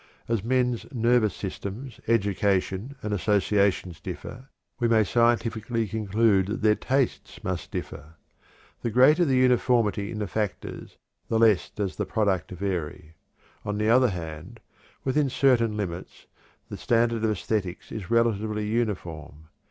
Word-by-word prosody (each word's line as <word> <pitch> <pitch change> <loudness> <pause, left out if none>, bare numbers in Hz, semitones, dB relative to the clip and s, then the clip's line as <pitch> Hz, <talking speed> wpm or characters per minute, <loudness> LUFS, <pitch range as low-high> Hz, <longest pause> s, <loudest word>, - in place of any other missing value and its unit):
As 115 -4 -1
men's 125 0 0
nervous 120 -4 +2
systems, 105 +5 -6
education, 100 +2 0
and 105 0 -2
associations 100 -3 +1
differ, 120 +8 -8 0.3
we 120 - +2
may 115 -1 +4
scientifically 115 0 +1
conclude 105 -1 +2
that 105 - -3
their 105 -1 +5
tastes 135 +3 -2
must - - -3
differ. 80 +3 -7 0.7
The 120 - -1
greater 140 +9 +5
the 135 -4 +2
uniformity 120 -5 +2
in 110 - -5
the 105 - -2
factors 105 +1 -4 0.3
the 115 - +1
less 110 -5 +4
does 100 -3 -4
the 105 - -2
product 100 -6 0
vary. 90 -4 -4 0.5
On 105 0 -3
the 105 +1 +1
other 125 +1 +5
hand, 80 -5 -7 0.4
within 140 +1 +1
certain 120 -5 +2
limits, 90 -3 -6 0.4
the - - -7
standard 115 -1 +1
of 110 - +2
æsthetics 95 -3 -3
is 105 -4 -6
relatively 110 -2 +1
uniform. 85 -9 -3
110 Hz, 135 wpm, -26 LUFS, 95-120 Hz, 0.7 s, their